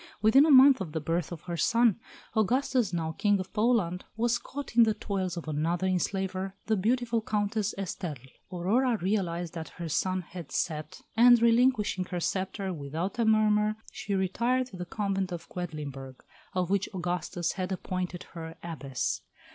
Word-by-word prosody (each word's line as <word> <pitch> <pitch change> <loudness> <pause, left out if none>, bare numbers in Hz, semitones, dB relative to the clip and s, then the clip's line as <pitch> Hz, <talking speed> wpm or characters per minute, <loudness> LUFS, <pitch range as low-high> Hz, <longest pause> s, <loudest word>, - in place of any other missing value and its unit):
Within 265 +8 +6
a - - +2
month 270 -3 +8
of 165 -5 -5
the 160 - -1
birth 165 +2 -2
of 170 - -6
her 175 -1 -4
son, 230 +4 +3 0.4
Augustus, 245 0 +2
now 165 -2 -2
King 205 +4 +2
of 185 - -6
Poland, 210 -6 +1
was 235 +1 +1
caught 280 -3 -7
in 240 - +7
the 220 -2 +4
toils 190 -4 -3
of 165 - -6
another 165 +4 0
enslaver, 190 +1 -1
the 220 - +2
beautiful 230 +3 +1
Countess 210 -1 -1
Esterle. 155 -9 -5 0.2
Aurora 225 +8 +1
realised 175 -3 -1
that 160 -3 -6
her 170 -2 -4
sun 185 +4 0
had 170 -3 -9
set, 155 -2 -3
and 240 +1 +7
relinquishing 230 -5 +3
her 180 -1 -4
sceptre 190 +2 -2
without 160 - -4
a 230 - +3
murmur, 215 -1 +3 0.2
she 200 - -3
retired 235 +7 +1
to 245 - -12
the 180 -1 -5
convent 195 -2 -1
of 170 -1 -6
Quedlinburg, 145 -7 -6 0.3
of 180 0 0
which 195 -1 +1
Augustus 175 -1 -2
had 185 0 -4
appointed 185 -1 -3
her 165 -1 -7
Abbess. 140 -6 -3
190 Hz, 165 wpm, -29 LUFS, 170-220 Hz, 0.4 s, month